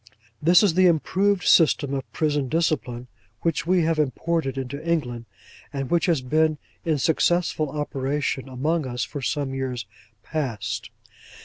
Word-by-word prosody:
This 175 Hz, +6 st, +6 dB
is 195 Hz, -5 st, +4 dB
the 185 Hz, +1 st, +5 dB
improved 185 Hz, +4 st, +2 dB
system 150 Hz, -4 st, +4 dB
of 135 Hz, -1 st, -4 dB
Prison 145 Hz, -4 st, 0 dB
Discipline 135 Hz, -7 st, -1 dB, 0.4 s
which 165 Hz, -1 st, 0 dB
we 180 Hz, -1 st, +3 dB
have 160 Hz, -1 st, +1 dB
imported 150 Hz, 0 st, -1 dB
into 135 Hz, +3 st, -5 dB
England, 125 Hz, -9 st, -1 dB, 0.5 s
and 135 Hz, -1 st, -4 dB
which 170 Hz, +1 st, +2 dB
has 165 Hz, -6 st, +2 dB
been 155 Hz, +4 st, +2 dB, 0.3 s
in 160 Hz, -3 st, +1 dB
successful 160 Hz, +1 st, +1 dB
operation 140 Hz, -2 st, -2 dB
among 150 Hz, +4 st, -1 dB
us 120 Hz, -2 st, -2 dB
for 145 Hz, +4 st, -6 dB
some 140 Hz, +1 st, -2 dB
years 130 Hz, -3 st, -3 dB, 0.4 s
past. 115 Hz, -6 st, -3 dB
150 Hz, 140 wpm, -24 LUFS, 130-165 Hz, 0.5 s, This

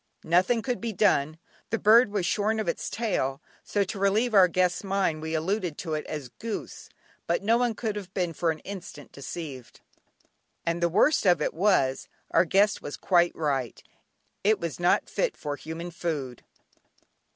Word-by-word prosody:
Nothing 185 Hz, +7 st, +3 dB
could 250 Hz, -2 st, -2 dB
be 230 Hz, -1 st, -3 dB
done. 155 Hz, -6 st, +2 dB, 0.3 s
The 225 Hz, -, 0 dB
bird 225 Hz, +3 st, +6 dB
was 200 Hz, -3 st, -1 dB
shorn 215 Hz, +5 st, +1 dB
of 220 Hz, -, -2 dB
its -, -, -2 dB
tail, 160 Hz, -, -1 dB, 0.2 s
so 205 Hz, -, 0 dB
to 195 Hz, +1 st, -6 dB
relieve 215 Hz, +5 st, +2 dB
our 190 Hz, -3 st, +7 dB
guest's 180 Hz, +1 st, +1 dB
mind 190 Hz, -5 st, 0 dB
we 160 Hz, +1 st, -3 dB
alluded 175 Hz, 0 st, -1 dB
to 160 Hz, -3 st, -4 dB
it 155 Hz, -, -3 dB
as 145 Hz, -5 st, -5 dB
"goose," 225 Hz, -2 st, -6 dB, 0.4 s
but 170 Hz, +3 st, 0 dB
no 225 Hz, +3 st, +4 dB
one 240 Hz, -2 st, +1 dB
could 215 Hz, -1 st, -3 dB
have 195 Hz, -3 st, -7 dB
been 175 Hz, -3 st, -1 dB
for 165 Hz, +2 st, 0 dB
an 160 Hz, -, -1 dB
instant 185 Hz, -7 st, -9 dB
deceived. 140 Hz, -2 st, -8 dB, 0.8 s
And 170 Hz, +1 st, -1 dB
the 170 Hz, -, +3 dB
worst 205 Hz, -, +3 dB
of 175 Hz, -3 st, +5 dB
it 150 Hz, -, -1 dB
was, 160 Hz, -8 st, +2 dB, 0.2 s
our -, -, +4 dB
guest 200 Hz, +4 st, +3 dB
was 145 Hz, -, -6 dB
quite 175 Hz, -2 st, +2 dB
right, 135 Hz, -7 st, -2 dB, 0.6 s
it 215 Hz, +2 st, +3 dB
was 170 Hz, -2 st, -4 dB
not 175 Hz, 0 st, +2 dB
fit -, -, -1 dB
for 145 Hz, -1 st, -4 dB
human 165 Hz, +4 st, -7 dB
food. 150 Hz, -7 st, -4 dB
180 Hz, 175 wpm, -27 LUFS, 160-210 Hz, 0.8 s, our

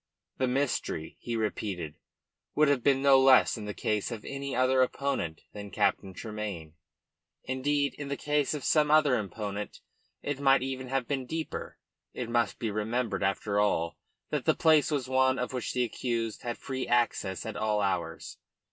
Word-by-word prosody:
The 130 Hz, -, +2 dB
mystery, 125 Hz, -, -1 dB
he 120 Hz, -, -4 dB
repeated, 100 Hz, -7 st, -2 dB, 0.6 s
would 150 Hz, 0 st, +4 dB
have 140 Hz, -3 st, +2 dB
been 135 Hz, +1 st, +3 dB
no 135 Hz, -1 st, +7 dB
less 130 Hz, -1 st, +6 dB
in 110 Hz, -3 st, -6 dB
the 105 Hz, -, -4 dB
case 105 Hz, -2 st, -1 dB
of 115 Hz, -3 st, -7 dB
any 140 Hz, 0 st, -4 dB
other 130 Hz, +1 st, +3 dB
opponent 130 Hz, -, -1 dB
than 105 Hz, -1 st, -7 dB
Captain 95 Hz, 0 st, 0 dB
Tremayne; 105 Hz, -8 st, -6 dB, 0.7 s
indeed, 140 Hz, +1 st, 0 dB
in 145 Hz, -, -4 dB
the 140 Hz, 0 st, -3 dB
case 150 Hz, 0 st, 0 dB
of 145 Hz, -, -5 dB
some 150 Hz, -1 st, +3 dB
other 150 Hz, -3 st, +5 dB
opponent 105 Hz, 0 st, -4 dB, 0.4 s
it 145 Hz, -1 st, -2 dB
might 135 Hz, -2 st, +4 dB
even 130 Hz, -1 st, -4 dB
have 130 Hz, -2 st, -1 dB
been 135 Hz, -3 st, -2 dB
deeper. 160 Hz, +2 st, -5 dB, 0.4 s
It 120 Hz, -, -4 dB
must 120 Hz, -4 st, +1 dB
be 115 Hz, -3 st, -2 dB
remembered, 110 Hz, +1 st, -1 dB
after 100 Hz, +1 st, 0 dB
all, 85 Hz, -5 st, +1 dB, 0.3 s
that -, -, -1 dB
the -, -, +4 dB
place 155 Hz, -2 st, +4 dB
was 140 Hz, -5 st, -1 dB
one 130 Hz, 0 st, +3 dB
to 125 Hz, -, -1 dB
which 125 Hz, -3 st, -3 dB
the 125 Hz, -, +1 dB
accused 115 Hz, -1 st, -2 dB
had 120 Hz, -1 st, -4 dB
free 130 Hz, -1 st, -4 dB
access 115 Hz, -6 st, 0 dB
at 110 Hz, -, -5 dB
all 105 Hz, -1 st, 0 dB
hours. 90 Hz, -5 st, -2 dB
125 Hz, 175 wpm, -29 LUFS, 105-135 Hz, 0.7 s, no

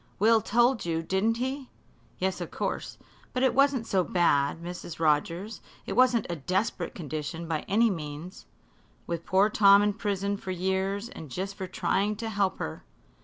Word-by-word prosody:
Will 220 Hz, +2 st, +4 dB
told 240 Hz, +4 st, +2 dB
you, 165 Hz, -1 st, -1 dB
didn't 195 Hz, +7 st, +1 dB
he?" 260 Hz, +2 st, -3 dB, 0.5 s
"Yes, 190 Hz, 0 st, -1 dB
of -, -, -4 dB
course. -, -, -4 dB, 0.4 s
But 255 Hz, -, 0 dB
it 260 Hz, -, +4 dB
wasn't 275 Hz, -3 st, +3 dB
so 190 Hz, -4 st, +1 dB
bad, 155 Hz, -5 st, +2 dB
Mrs. 175 Hz, -1 st, -7 dB
Rogers; 165 Hz, +7 st, 0 dB, 0.2 s
it -, -, -3 dB
wasn't 250 Hz, -3 st, +4 dB
a 175 Hz, -, -3 dB
desperate 185 Hz, +9 st, -2 dB
condition, 155 Hz, +1 st, -5 dB
by 160 Hz, -2 st, -1 dB
any 225 Hz, +3 st, +3 dB
means." 160 Hz, +1 st, -7 dB, 0.6 s
"With 170 Hz, -1 st, -4 dB
poor 190 Hz, +2 st, +4 dB
Tom 200 Hz, -1 st, +6 dB
in 205 Hz, 0 st, +2 dB
prison 200 Hz, -1 st, -2 dB
for 190 Hz, -, -9 dB
years 190 Hz, +4 st, -1 dB
and 160 Hz, -, -9 dB
just 190 Hz, +8 st, -4 dB
for 190 Hz, -1 st, -6 dB
trying 195 Hz, +3 st, 0 dB
to 225 Hz, +2 st, -4 dB
help 200 Hz, -3 st, 0 dB
her." 75 Hz, -, -5 dB
195 Hz, 170 wpm, -28 LUFS, 170-220 Hz, 0.6 s, Tom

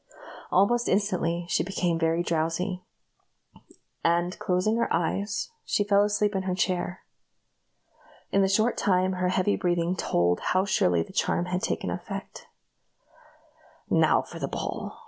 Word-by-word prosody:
Almost 235 Hz, +6 st, +3 dB
instantly 180 Hz, -4 st, 0 dB
she -, -, +1 dB
became 175 Hz, -2 st, -1 dB
very 165 Hz, +1 st, +1 dB
drowsy, 170 Hz, +3 st, -1 dB, 1.2 s
and, 175 Hz, +2 st, +1 dB
closing 185 Hz, +5 st, +1 dB
her 235 Hz, -, 0 dB
eyes, 200 Hz, -, -1 dB
she 205 Hz, -, +1 dB
fell 200 Hz, 0 st, +4 dB
asleep 210 Hz, 0 st, +1 dB
in 190 Hz, -, 0 dB
her 185 Hz, -1 st, -2 dB
chair. 180 Hz, 0 st, -1 dB, 1.3 s
In 195 Hz, -, +3 dB
a 190 Hz, -, +2 dB
short 215 Hz, +5 st, +2 dB
time 185 Hz, -1 st, +2 dB
her 180 Hz, 0 st, 0 dB
heavy 185 Hz, +2 st, +1 dB
breathing 175 Hz, 0 st, 0 dB
told 85 Hz, -, +1 dB
how 185 Hz, +1 st, +1 dB
surely 90 Hz, -, +2 dB
the -, -, -15 dB
charm 175 Hz, -, 0 dB
had 180 Hz, +1 st, -2 dB
taken 230 Hz, -, -2 dB
effect. -, -, -7 dB, 1.4 s
"Now -, -, +4 dB
for -, -, -10 dB
the -, -, -2 dB
ball!" -, -, -5 dB
185 Hz, 140 wpm, -27 LUFS, 175-200 Hz, 1.4 s, fell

